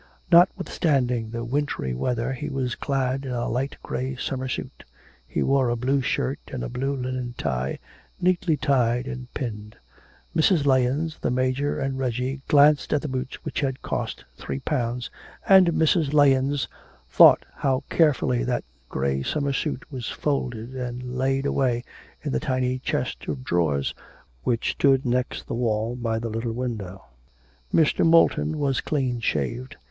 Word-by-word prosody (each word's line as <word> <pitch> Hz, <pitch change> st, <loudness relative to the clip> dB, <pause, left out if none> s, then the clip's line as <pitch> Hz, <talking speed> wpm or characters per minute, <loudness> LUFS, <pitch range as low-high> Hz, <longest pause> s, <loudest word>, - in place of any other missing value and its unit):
Notwithstanding 145 Hz, -, +3 dB
the 115 Hz, +1 st, -4 dB
wintry 130 Hz, -, -1 dB
weather 120 Hz, -, -1 dB
he 150 Hz, +4 st, -5 dB
was 130 Hz, -4 st, -2 dB
clad 135 Hz, -1 st, -1 dB
in 130 Hz, -2 st, -4 dB
a 120 Hz, -1 st, -1 dB
light 130 Hz, +4 st, -2 dB
grey 130 Hz, +1 st, -3 dB
summer 130 Hz, 0 st, -3 dB
suit; 130 Hz, -, -5 dB, 0.4 s
he -, -, -1 dB
wore 135 Hz, -2 st, +2 dB
a 120 Hz, -, +1 dB
blue 130 Hz, +4 st, +1 dB
shirt 130 Hz, +2 st, -1 dB
and 130 Hz, -, -5 dB
a -, -, -4 dB
blue 135 Hz, +3 st, -2 dB
linen 125 Hz, -1 st, -4 dB
tie, 65 Hz, -2 st, -2 dB, 0.4 s
neatly 180 Hz, -3 st, +2 dB
tied 125 Hz, -4 st, +2 dB
and 125 Hz, -1 st, -7 dB
pinned. 105 Hz, -5 st, -5 dB, 0.6 s
Mrs. 160 Hz, -2 st, +3 dB
Lahens, 135 Hz, +4 st, +1 dB
the -, -, -1 dB
Major, 130 Hz, +3 st, 0 dB
and 135 Hz, -1 st, -2 dB
Reggie 130 Hz, +2 st, -2 dB
glanced 145 Hz, 0 st, +5 dB
at 150 Hz, -, +1 dB
the -, -, -2 dB
boots 130 Hz, -1 st, -5 dB
which -, -, -3 dB
had 135 Hz, -2 st, -2 dB
cost -, -, -3 dB
three 70 Hz, 0 st, -5 dB
pounds, 125 Hz, -3 st, -2 dB, 0.4 s
and 190 Hz, -2 st, +7 dB
Mrs. 160 Hz, -2 st, +2 dB
Lahens 140 Hz, -1 st, +3 dB, 0.4 s
thought -, -, +7 dB
how 135 Hz, -2 st, 0 dB
carefully 125 Hz, -, +3 dB
that -, -, -1 dB, 0.3 s
grey 70 Hz, 0 st, -1 dB
summer 140 Hz, -, -1 dB
suit 140 Hz, 0 st, -2 dB
was 125 Hz, -4 st, -4 dB
folded 125 Hz, -5 st, -2 dB
and 125 Hz, 0 st, -5 dB
laid 135 Hz, +1 st, 0 dB
away 125 Hz, -4 st, +1 dB, 0.4 s
in -, -, -2 dB
the 65 Hz, -, +1 dB
tiny 130 Hz, -, -1 dB
chest 130 Hz, 0 st, -3 dB
of 135 Hz, -2 st, -3 dB
drawers 80 Hz, -, 0 dB, 0.5 s
which 115 Hz, -, 0 dB
stood 135 Hz, -1 st, +3 dB
next 125 Hz, +1 st, -1 dB
the -, -, -5 dB
wall 115 Hz, 0 st, 0 dB
by 115 Hz, -2 st, -1 dB
the 115 Hz, +1 st, -3 dB
little 115 Hz, +1 st, -3 dB
window. 110 Hz, -6 st, -5 dB, 0.7 s
Mr. 155 Hz, -2 st, +3 dB
Moulton 155 Hz, -2 st, +4 dB
was 140 Hz, -3 st, 0 dB
clean 130 Hz, -5 st, -1 dB
shaved. 115 Hz, -, -2 dB
130 Hz, 155 wpm, -25 LUFS, 120-140 Hz, 0.7 s, and